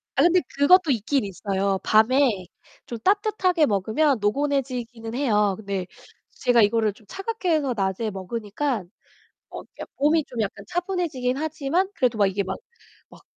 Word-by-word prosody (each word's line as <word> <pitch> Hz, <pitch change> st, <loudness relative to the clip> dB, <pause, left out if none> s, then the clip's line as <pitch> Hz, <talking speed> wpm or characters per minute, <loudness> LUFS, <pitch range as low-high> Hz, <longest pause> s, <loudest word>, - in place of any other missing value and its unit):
아 275 Hz, -, +3 dB
근데 350 Hz, +3 st, +5 dB, 0.2 s
그것도 320 Hz, +2 st, +5 dB
있긴 250 Hz, +3 st, 0 dB
있어요. 195 Hz, 0 st, -1 dB
밤에 220 Hz, -2 st, +3 dB, 0.4 s
좀 235 Hz, -2 st, -7 dB
따뜻하게 385 Hz, -, +2 dB
먹으면 220 Hz, +6 st, +1 dB
노곤해지기는 245 Hz, -1 st, -2 dB
해요. 210 Hz, -7 st, +2 dB
근데 195 Hz, -3 st, -4 dB, 0.4 s
제가 245 Hz, -2 st, +2 dB
이거를 215 Hz, 0 st, +2 dB
좀 205 Hz, 0 st, -22 dB
차갑게 390 Hz, -1 st, -3 dB
해서 295 Hz, -5 st, +1 dB
낮에 195 Hz, +2 st, -1 dB
먹으니까 210 Hz, +5 st, -3 dB, 0.7 s
어 -, -, -7 dB, 0.2 s
약 -, -, -7 dB
몸이 300 Hz, +2 st, +2 dB
좀 240 Hz, -, -6 dB
약간 210 Hz, -2 st, -3 dB
차분해지긴 345 Hz, -8 st, -2 dB
하지만 315 Hz, +4 st, -1 dB
그래도 250 Hz, -, 0 dB
막 205 Hz, -, +4 dB
이게 195 Hz, +1 st, -1 dB
막 190 Hz, 0 st, -4 dB, 0.5 s
막 -, -, -16 dB
250 Hz, 320 characters per minute, -24 LUFS, 210-305 Hz, 0.7 s, 근데